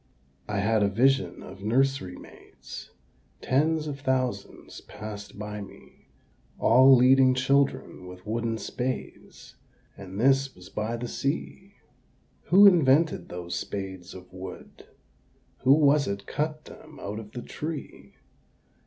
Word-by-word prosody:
I 100 -1 -1
had 110 +1 +2
a 100 - +4
vision 130 +7 +1
of 95 - -11
nursery 125 -4 0
maids; - - -12 0.5
Tens 155 +4 +1
of 145 -2 -5
thousands 130 -2 -3
passed 105 -1 -9
by 105 0 -6
me 100 - -14 0.5
All 130 +3 +6
leading 130 +1 +5
children 130 -7 0
with 90 0 -12
wooden 115 +1 -2
spades, 125 +4 -6 0.4
And 95 0 -9
this 135 +2 +2
was 90 0 -14
by 110 +2 -3
the 120 +1 -5
Sea. 185 +10 -4 0.7
Who 195 +3 +7
invented 160 - +4
those 90 0 -6
spades 95 -2 -6
of 90 0 -13
wood? 95 +1 -10 0.7
Who 135 - +5
was 145 -1 +4
it 100 0 -4
cut 155 +1 -3
them - - -13
out 105 +2 -5
of 110 0 -11
the 120 - -6
tree? 155 0 -7
125 Hz, 125 wpm, -27 LUFS, 100-135 Hz, 0.7 s, Who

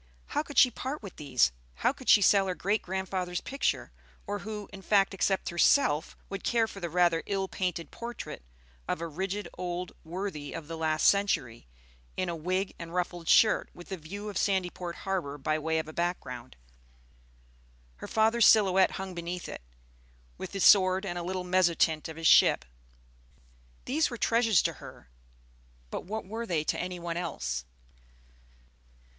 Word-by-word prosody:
How 295 - 0
could 290 -2 -10
she 250 - +7
part 265 +3 -5
with 195 - -9
these? 130 - +2 0.2
How 250 - +1
could 260 - -7
she 205 - +7
sell 195 0 +5
her 185 - -2
great 205 +5 0
grandfather's 185 -1 -3
picture, 275 +1 -2 0.3
or 205 0 -3
who, 210 -1 -6
in 195 - -9
fact, 195 0 +3
except 195 0 0
herself, 170 - +3
would 195 0 -6
care 230 -2 +2
for 200 - -9
the 170 -2 -4
rather 170 -1 +3
ill 195 -1 -1
painted 180 -3 -3
portrait 235 - -7 0.5
of - - -1
a 170 - -3
rigid 190 +6 -3
old 180 0 -3
worthy 165 -4 -5
of 165 -3 -7
the 165 - -5
last 155 -1 +1
century, 155 - +1 0.5
in 185 -1 -1
a 170 - -2
wig 185 +4 -2
and 170 +1 -7
ruffled 175 -2 -2
shirt, 220 - +5
with 175 +2 -12
a 190 - -3
view 200 +6 -7
of 205 -3 -3
Sandyport 180 -3 -1
harbor 180 -7 -2
by 155 +2 -1
way 160 +1 0
of 160 - -2
a 155 - -9
background? 130 -8 -4 1.4
Her - - -8
father's 225 +1 +4
silhouette 190 -3 +5
hung 190 -1 -5
beneath 175 +1 -5
it, - - -7 0.7
with - - -7
his 195 - -1
sword 190 0 +6
and 175 -2 -3
a - - -4
little 185 +1 -3
mezzotint 175 -4 +2
of 160 - -8
his 165 - -6
ship. - - +6 1.2
These 300 +5 +1
were 240 - -6
treasures 225 -4 +3
to - - 0
her, - - -12 0.8
but - - -5
what 215 +3 -4
were 225 +4 -5
they 165 -5 0
to - - -1
any 180 0 -3
one 170 0 -4
else? 65 - -3
185 Hz, 170 wpm, -29 LUFS, 165-200 Hz, 1.4 s, she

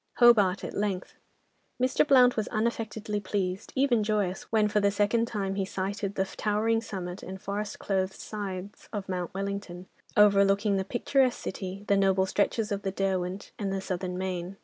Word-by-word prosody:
Hobart, 210 -6 +5
at - - -5
length. 200 -3 -2 0.7
Mr. 255 +3 +2
Blount 250 -3 +6
was 215 - -1
unaffectedly 220 -2 -2
pleased, 190 0 -2
even 260 -5 +3
joyous, 205 -3 -1
when 215 -1 +4
for 210 0 +1
the 200 -1 +3
second 210 +3 +1
time 195 -4 -2
he 195 0 -1
sighted 195 +1 -3
the 190 - +1
towering 215 +3 0
summit 185 -4 -6
and 190 +1 -7
forest 200 +2 -4
clothed 190 -1 -1
sides 200 -2 -6
of 205 -3 -4
Mount 180 -2 -3
Wellington, 195 -2 -4 0.3
overlooking 200 0 +5
the 190 - 0
picturesque 250 +4 +1
city, 190 +1 -6
the 200 - +4
noble 190 -1 +3
stretches 210 +3 0
of 200 0 -1
the 195 - -2
Derwent, 190 -1 -2
and 200 -2 -1
the 195 - -1
Southern 185 -1 -3
main. 185 0 -4
200 Hz, 170 wpm, -28 LUFS, 190-215 Hz, 0.7 s, Blount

